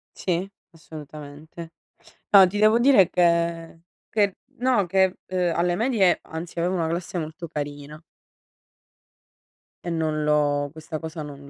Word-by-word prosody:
Sì, 185 Hz, +1 st, -2 dB, 0.2 s
assolutamente. 155 Hz, 0 st, -11 dB, 0.6 s
No 195 Hz, -2 st, +9 dB
ti 195 Hz, +3 st, -5 dB
devo 215 Hz, +2 st, +5 dB
dire 240 Hz, -7 st, +5 dB
che 170 Hz, -1 st, 0 dB, 0.3 s
che 205 Hz, -3 st, +1 dB, 0.2 s
no 245 Hz, -6 st, +2 dB
che, 190 Hz, +1 st, +1 dB
uhm, 180 Hz, -2 st, 0 dB
alle 175 Hz, +1 st, +1 dB
medie 215 Hz, -5 st, +2 dB
anzi 165 Hz, +1 st, -7 dB
avevo 180 Hz, +2 st, 0 dB
una 165 Hz, -3 st, -1 dB
classe 175 Hz, +2 st, -4 dB
molto 160 Hz, +1 st, -6 dB
carina 145 Hz, 0 st, -7 dB, 1.8 s
e -, -, -4 dB
non 155 Hz, -2 st, -1 dB
l'ho 145 Hz, -1 st, +1 dB
questa 160 Hz, 0 st, -7 dB
cosa 160 Hz, -1 st, -7 dB
non 140 Hz, -1 st, -11 dB
170 Hz, 130 wpm, -24 LUFS, 155-185 Hz, 1.8 s, No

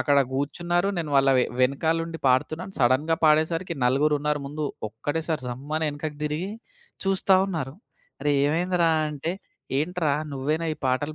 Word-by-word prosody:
అక్కడ 140 Hz, +2 st, +3 dB
గూర్చున్నారు. 175 Hz, +7 st, 0 dB
నేను 155 Hz, -3 st, -3 dB
వాళ్ళ 135 Hz, 0 st, +5 dB
వె -, -, +4 dB, 0.2 s
వెనకాల 150 Hz, +6 st, +2 dB
ఉండి 165 Hz, -1 st, -6 dB
పాడుతున్నాను. 155 Hz, +9 st, 0 dB
సడెన్‌గా 135 Hz, +6 st, +3 dB
పాడేసరికి 165 Hz, +3 st, +2 dB
నలుగురున్నారు 145 Hz, +3 st, +2 dB
ముందు. 150 Hz, +2 st, -4 dB, 0.2 s
ఒక్కటే 145 Hz, +9 st, -3 dB
సారి 155 Hz, -5 st, -1 dB
జమ్మని 145 Hz, +6 st, -2 dB
ఎనకకి 145 Hz, +1 st, -5 dB
దిరిగి 155 Hz, +6 st, -2 dB, 0.5 s
చూస్తా 195 Hz, 0 st, +3 dB
ఉన్నారు. 150 Hz, -7 st, -4 dB, 0.5 s
"అరేయ్! 145 Hz, -1 st, +2 dB
ఏమైందిరా?" 175 Hz, +2 st, +2 dB, 0.2 s
అంటే 150 Hz, +3 st, -3 dB, 0.5 s
"ఏంట్రా? 165 Hz, -1 st, 0 dB, 0.2 s
నువ్వేనా 150 Hz, +5 st, -1 dB
ఈ -, -, -20 dB
పాటలు 145 Hz, +4 st, 0 dB
150 Hz, 140 wpm, -25 LUFS, 140-165 Hz, 0.5 s, వాళ్ళ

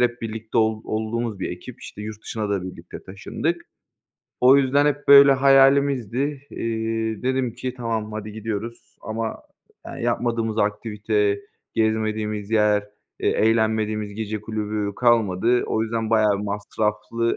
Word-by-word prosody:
hep 120 Hz, -1 st, +1 dB
birlikte 110 Hz, 0 st, -3 dB
ol 110 Hz, 0 st, +1 dB
olduğumuz 110 Hz, -1 st, -2 dB
bir -, -, -2 dB
ekip, 90 Hz, +8 st, -9 dB
işte, 105 Hz, -, -9 dB
yurt 110 Hz, 0 st, -7 dB
dışına 105 Hz, -2 st, -4 dB
da 100 Hz, -2 st, 0 dB
birlikte 90 Hz, -, -9 dB
taşındık. 155 Hz, -, -3 dB, 0.8 s
O 130 Hz, +2 st, +7 dB
yüzden 140 Hz, +2 st, +3 dB
hep 145 Hz, 0 st, -1 dB
böyle 140 Hz, 0 st, +9 dB
hayalimizdi. 135 Hz, -3 st, +4 dB, 0.3 s
Eee, 110 Hz, -1 st, -2 dB
dedim 130 Hz, -2 st, 0 dB
ki, 130 Hz, -1 st, -5 dB
"Tamam 115 Hz, -3 st, -3 dB
hadi 105 Hz, 0 st, -6 dB
gidiyoruz." 110 Hz, +1 st, -6 dB
Ama 110 Hz, +1 st, -4 dB, 0.4 s
yani -, -, -7 dB
yapmadığımız 115 Hz, -2 st, -1 dB
aktivite, 105 Hz, -1 st, 0 dB, 0.3 s
gezmediğimiz 110 Hz, -1 st, -1 dB
yer, 105 Hz, -2 st, +3 dB, 0.4 s
eee, -, -, +1 dB
eğlenmediğimiz 110 Hz, -2 st, +1 dB
gece 110 Hz, -1 st, -4 dB
kulübü 105 Hz, -1 st, -3 dB
kalmadı. 120 Hz, -1 st, +2 dB
O 110 Hz, -, 0 dB
yüzden 115 Hz, 0 st, -2 dB
bayağı 105 Hz, -3 st, +3 dB
masraflı 105 Hz, +3 st, -2 dB
110 Hz, 130 wpm, -23 LUFS, 105-120 Hz, 0.8 s, böyle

